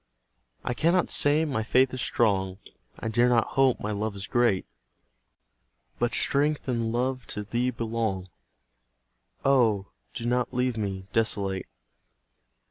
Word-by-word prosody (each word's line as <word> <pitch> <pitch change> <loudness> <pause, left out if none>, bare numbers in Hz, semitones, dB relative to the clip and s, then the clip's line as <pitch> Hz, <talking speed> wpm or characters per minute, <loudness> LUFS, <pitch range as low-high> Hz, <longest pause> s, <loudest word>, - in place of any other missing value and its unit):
I 125 - -1
cannot 170 +7 +2
say 150 +2 +4
my 135 -8 -1
faith 130 +4 +3
is 130 - -3
strong, 95 -6 +1 0.4
I - - -4
dare 120 +2 +3
not 120 -2 +2
hope 135 -2 +3
my 105 - -3
love 105 0 -2
is 100 0 -5
great; 120 -6 +2 1.3
But 120 0 0
strength 145 +1 +1
and 115 -3 -1
love 125 0 -1
to 105 - -4
Thee 120 +4 -1
belong; 110 -6 -2 1.2
Oh, 115 -8 +3 0.3
do 115 - -5
not 125 +1 0
leave 125 -1 +1
me 95 -3 -3
desolate! 100 -4 0
115 Hz, 130 wpm, -27 LUFS, 105-130 Hz, 1.3 s, say